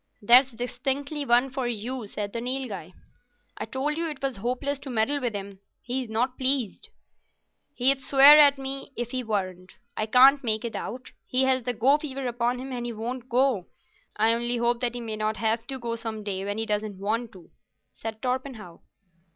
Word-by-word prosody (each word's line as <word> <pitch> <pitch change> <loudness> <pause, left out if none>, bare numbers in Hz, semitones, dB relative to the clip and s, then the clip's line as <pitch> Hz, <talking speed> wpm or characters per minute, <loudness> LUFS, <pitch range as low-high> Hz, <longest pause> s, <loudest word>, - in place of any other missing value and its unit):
"That's 250 +5 +6
distinctly 270 +5 -3
one 245 +2 +4
for 260 -1 -2
you," 240 +1 -4
said 205 0 -5
the 230 - -3
Nilghai. 245 -9 -4 0.6
"I - - -5
told 280 +7 -2
you 335 -1 0
it 295 -3 -8
was 270 -4 -2
hopeless 255 +6 -2
to 275 - -9
meddle 255 +5 0
with 240 -4 -2
him. 200 -1 -7 0.2
He's 250 -1 -4
not 245 +4 -1
pleased." 260 -5 0 0.9
"He'd 270 +2 +4
swear 280 +2 +8
at 285 -1 +7
me 270 +1 -6
if 240 0 -3
he 255 -1 -3
weren't. 185 -4 -4 0.2
I 215 - -2
can't 270 +5 +6
make 220 -1 0
it 230 - -5
out. 255 +3 -6 0.2
He 255 +1 +1
has 260 -2 +1
the 245 - -1
go 265 +6 +3
fever 275 -3 -5
upon 240 0 -1
him 265 +2 -7
and 245 -1 -4
he 235 - -4
won't 240 +3 -6
go. 245 -6 +1 0.5
I 220 +2 +4
only 240 +1 -1
hope 235 0 +1
that 245 -1 -1
he 245 - -4
mayn't 215 -1 -3
have 225 +1 -1
to 270 - -3
go 235 -2 -4
some 225 -2 -6
day 195 -2 -3
when 205 +1 -3
he 225 - -1
doesn't 210 -2 -2
want 220 +4 -2
to," 180 -4 -16 0.4
said 220 -1 -7
Torpenhow. 250 -8 -4
245 Hz, 190 wpm, -26 LUFS, 220-265 Hz, 0.9 s, swear